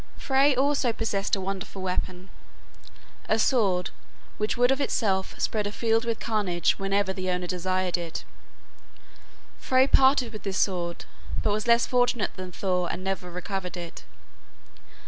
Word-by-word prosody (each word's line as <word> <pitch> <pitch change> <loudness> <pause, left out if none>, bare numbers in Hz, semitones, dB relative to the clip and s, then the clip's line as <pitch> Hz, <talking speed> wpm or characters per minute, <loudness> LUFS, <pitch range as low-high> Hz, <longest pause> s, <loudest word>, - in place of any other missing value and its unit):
Frey 275 +1 +3
also 275 -2 +2
possessed 210 -3 -1
a - - -4
wonderful 195 +1 -5
weapon, 185 0 -3 1.0
a 220 - +3
sword 200 -7 +2 0.5
which 210 +2 -1
would 245 +1 +4
of 270 +1 +1
itself 195 -8 0
spread 210 -2 0
a - - -4
field 225 +1 +1
with 230 -1 -1
carnage 190 -7 +1
whenever 195 0 0
the 185 -1 -3
owner 180 0 -1
desired 185 0 -1
it. 170 -2 -5 1.4
Frey 260 0 +4
parted 265 -3 +4
with 215 - -7
this 195 -1 -3
sword, 175 -3 -1 0.4
but 210 - +2
was 215 +2 -2
less 235 0 +5
fortunate 245 -3 +1
than 185 -1 -7
Thor 180 -1 -1
and 185 - -5
never 190 -2 -3
recovered 180 +1 -5
it. 170 -1 -8
195 Hz, 145 wpm, -26 LUFS, 185-230 Hz, 1.4 s, less